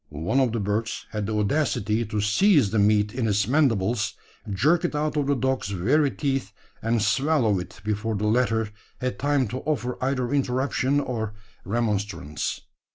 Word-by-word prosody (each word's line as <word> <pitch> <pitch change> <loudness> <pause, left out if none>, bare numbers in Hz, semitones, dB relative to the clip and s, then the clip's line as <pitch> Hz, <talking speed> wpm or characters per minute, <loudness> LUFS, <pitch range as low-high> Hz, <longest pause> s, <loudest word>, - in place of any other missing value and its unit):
One 80 - -1
of 130 -3 +2
the 115 - -1
birds 105 +2 -2
had 105 -2 -3
the 110 - -2
audacity 105 -1 +1
to 105 0 -2
seize 130 - +4
the 110 - +1
meat 105 0 +3
in 125 -2 -1
its 100 -1 +1
mandibles, 115 -7 +1 0.3
jerk 155 - +2
it 175 - -1
out 150 +1 -1
of 145 -2 0
the 140 - +2
dog's 130 -2 -1
very 130 - +2
teeth, 135 -8 -2 0.3
and 115 +1 +1
swallow 110 -1 +2
it, 90 0 -8
before 105 +1 -1
the 105 +1 -1
latter 110 -1 +1 0.3
had 125 0 -3
time 140 -3 +1
to 125 +4 -4
offer 125 -4 -2
either 130 -1 0
interruption 135 +1 +1
or 110 -6 -3 0.3
remonstrance. 100 -9 -2
115 Hz, 165 wpm, -25 LUFS, 105-135 Hz, 0.3 s, seize